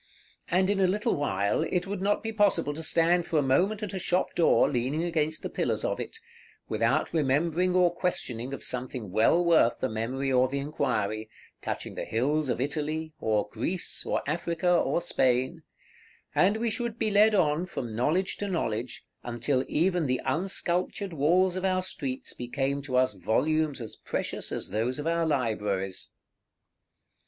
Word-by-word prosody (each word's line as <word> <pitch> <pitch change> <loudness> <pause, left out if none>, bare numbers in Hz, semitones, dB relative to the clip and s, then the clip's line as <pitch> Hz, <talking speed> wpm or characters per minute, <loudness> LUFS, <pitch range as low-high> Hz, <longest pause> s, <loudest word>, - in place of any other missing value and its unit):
And 185 +3 +2
in 200 - 0
a 190 - +4
little 210 +5 0
while, 100 -8 0
it 180 0 -1
would 195 -1 -4
not 205 +1 +1
be 225 - -2
possible 195 -8 +2
to 160 - -6
stand 170 +2 +3
for 160 - 0
a 145 - +3
moment 190 +11 +2
at 205 - -4
a 190 - -3
shop 180 +1 0
door, 170 - +4
leaning 135 +5 -1
against 160 -2 -1
the - - -1
pillars - - -1
of - - -1
it, - - -5 0.5
without 115 +7 0
remembering 165 +5 +1
or 180 -1 +4
questioning 130 -9 -2
of 140 - -6
something 125 -5 -4
well 115 - +3
worth 160 -9 +4
the - - -1
memory 125 +5 -2
or 130 0 +4
the 140 +2 -3
inquiry, 110 -7 -2 0.3
touching - - -4
the - - -5
hills 140 +5 0
of - - 0
Italy, 155 +3 -2
or 105 -2 0
Greece, 170 +11 -2
or - - -1
Africa, 170 +3 0
or 170 0 +1
Spain; 130 +1 +1 0.7
and 200 +4 +3
we 230 0 0
should 235 0 -2
be 220 -2 0
led 210 +1 +5
on 165 -1 +2
from 120 -10 -5
knowledge 165 - +1
to 205 - -3
knowledge, 125 - -3 0.2
until 120 +3 -1
even 175 -1 +1
the 130 0 0
unsculptured 185 +1 -1
walls 175 +5 +3
of 185 - -3
our 185 -1 +1
streets 135 -8 -4
became 135 +3 -2
to 135 -2 -4
us 130 -4 +3
volumes 150 - 0
as 115 -3 -6
precious - - -2
as - - -3
those 115 +5 -1
of 145 - -5
our 165 0 +1
libraries. 105 -9 -1
155 Hz, 170 wpm, -28 LUFS, 125-180 Hz, 0.7 s, led